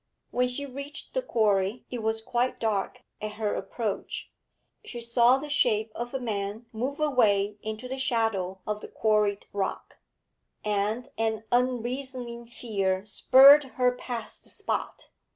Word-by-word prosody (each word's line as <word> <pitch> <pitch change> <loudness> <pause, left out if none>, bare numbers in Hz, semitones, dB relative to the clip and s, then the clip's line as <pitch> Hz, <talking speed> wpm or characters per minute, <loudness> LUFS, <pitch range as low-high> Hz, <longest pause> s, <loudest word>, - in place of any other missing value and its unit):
When 250 0 +2
she 250 +3 -4
reached 280 +2 -8
the - - +1
quarry 215 - +1
it 245 -2 -3
was 220 0 -1
quite 245 +3 -1
dark 210 -4 -1 0.2
at 215 0 -4
her 210 -1 -1
approach 205 +1 -4 0.5
she 255 - -7
saw 235 +2 +4
the 290 +2 -6
shape 220 -6 +2
of 240 +1 -5
a - - 0
man 210 -1 -3
move 260 +6 -3
away 210 -8 +2
into 220 +3 -5
the 265 +1 -4
shadow 225 -8 0
of 210 0 -3
the - - -7
quarried 210 -2 +1
rock, 200 -1 -3 0.7
and 210 +3 -1
an 220 -1 0
unreasoning 245 -1 -1
fear 195 -5 -1
spurred 270 +7 +8
her 250 -1 +4
past 240 -3 -6
the - - -9
spot. - - -4
230 Hz, 145 wpm, -27 LUFS, 210-250 Hz, 0.7 s, spurred